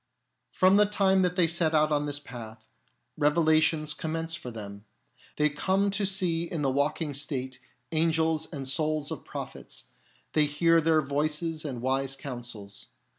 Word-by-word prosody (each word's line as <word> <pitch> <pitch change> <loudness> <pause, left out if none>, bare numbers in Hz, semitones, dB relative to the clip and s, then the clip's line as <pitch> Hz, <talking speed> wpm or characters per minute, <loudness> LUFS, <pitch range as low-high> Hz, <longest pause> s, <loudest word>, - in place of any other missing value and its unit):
From 185 +1 +4
the 210 0 +5
time 195 -2 +3
that 180 -1 +1
they 180 -2 +4
set 165 -1 +1
out 155 0 +3
on 145 0 +1
this 145 0 0
path, 110 -5 -10 0.5
revelations 155 0 +3
commence 165 +1 -3
for 130 - -4
them. 100 -3 -8 0.5
They 150 - +3
come 190 +7 0
to 200 0 0
see 180 -4 0
in 165 -3 -4
the 135 - +2
waking 145 +2 -1
state 130 -2 -3 0.3
angels 160 0 +1
and 140 -5 -4
souls 155 +1 0
of - - -6
pro - - -5
phets; - - -10 0.5
they 150 -1 +4
hear 165 +3 +3
their 160 -1 +3
voices 155 +3 -1
and 130 -6 -5
wise 135 +1 0
counsels. 120 -7 -8
155 Hz, 160 wpm, -28 LUFS, 140-165 Hz, 0.5 s, the